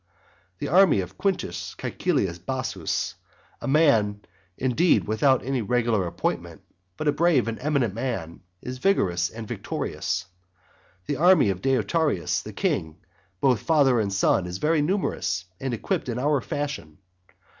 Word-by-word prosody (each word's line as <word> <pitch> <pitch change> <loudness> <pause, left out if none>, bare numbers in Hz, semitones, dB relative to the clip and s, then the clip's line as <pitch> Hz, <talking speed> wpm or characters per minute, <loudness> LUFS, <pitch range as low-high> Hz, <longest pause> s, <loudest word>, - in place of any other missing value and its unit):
The - - -4
army 180 - +5
of 90 +1 -8
Quintus 195 -2 -2
Caecilius 90 -2 -1
Bassus, 130 +8 -3 0.5
a - - -4
man 115 -9 +3 0.4
indeed 130 +6 +2
without 130 +5 +2
any 135 -1 0
regular 115 -3 +1
appointment, - - -3 0.4
but 155 - -3
a - - +5
brave 160 -6 +2
and 115 - -3
eminent 140 -7 0
man, 100 -9 -4 0.2
is 125 0 -6
vigorous 90 - +2
and 110 -1 -8
victorious. 95 -1 -3 0.8
The 145 - -2
army 175 - +5
of 95 -1 -5
Deiotarus 135 - +1
the - - -8
king, 80 -1 -1 0.4
both 125 -5 +3
father 140 -7 +3
and 100 -2 0
son, 95 -2 +2
is 90 +1 -5
very 155 +6 +2
numerous, 145 - -1
and 135 - -3
equipped 120 +2 -2
in 120 - -2
our 145 +1 +1
fashion. 145 - -4
125 Hz, 140 wpm, -25 LUFS, 100-150 Hz, 0.8 s, army